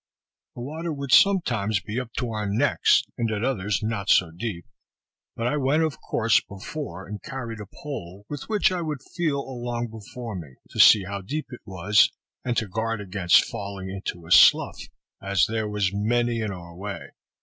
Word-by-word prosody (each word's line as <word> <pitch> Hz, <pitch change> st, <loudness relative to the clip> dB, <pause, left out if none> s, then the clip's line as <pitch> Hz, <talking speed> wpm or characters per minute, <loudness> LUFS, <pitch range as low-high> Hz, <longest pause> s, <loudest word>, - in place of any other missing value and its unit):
The 120 Hz, -, -7 dB
water 160 Hz, +6 st, -4 dB
would 140 Hz, -3 st, -5 dB
sometimes 120 Hz, -, +4 dB
be 105 Hz, +7 st, -4 dB
up 125 Hz, -2 st, -6 dB
to 125 Hz, -3 st, -1 dB
our 105 Hz, -1 st, -2 dB
necks, 120 Hz, +8 st, +3 dB, 0.2 s
and 115 Hz, -1 st, +1 dB
at 110 Hz, 0 st, -2 dB
others 105 Hz, -6 st, 0 dB
not 110 Hz, -3 st, -2 dB
so 90 Hz, -3 st, +4 dB
deep; 85 Hz, -1 st, -5 dB, 0.7 s
but 115 Hz, -, -3 dB
I 125 Hz, +5 st, +1 dB
went, 145 Hz, +3 st, +2 dB
of 155 Hz, -3 st, -2 dB
course, 115 Hz, 0 st, +2 dB
before, 95 Hz, -, -7 dB
and 105 Hz, +1 st, -7 dB
carried 115 Hz, -4 st, -6 dB
a 105 Hz, -, -8 dB
pole, 100 Hz, -7 st, -8 dB
with 145 Hz, +5 st, -7 dB
which 210 Hz, -3 st, +3 dB
I 180 Hz, -1 st, -1 dB
would 150 Hz, -5 st, -4 dB
feel 155 Hz, -5 st, 0 dB
along 120 Hz, -3 st, -4 dB
before 115 Hz, +1 st, -8 dB
me, 75 Hz, -8 st, -8 dB, 0.2 s
to -, -, -7 dB
see 105 Hz, -3 st, +8 dB
how 100 Hz, +1 st, -5 dB
deep 150 Hz, +11 st, -4 dB
it 125 Hz, -, -9 dB
was, 95 Hz, +2 st, +4 dB, 0.3 s
and 120 Hz, -2 st, -1 dB
to 110 Hz, -, 0 dB
guard 115 Hz, +3 st, -2 dB
against 95 Hz, -3 st, +3 dB
falling 100 Hz, -1 st, -6 dB
into 90 Hz, -3 st, -5 dB
a 85 Hz, -, -11 dB
slough, -, -, +6 dB, 0.4 s
as 100 Hz, -1 st, +2 dB
there 110 Hz, -1 st, -2 dB
was 100 Hz, -2 st, 0 dB
many 120 Hz, +3 st, +1 dB
in 110 Hz, -2 st, -2 dB
our 85 Hz, -2 st, -9 dB
way. 100 Hz, +2 st, -7 dB
110 Hz, 185 wpm, -25 LUFS, 100-125 Hz, 0.7 s, see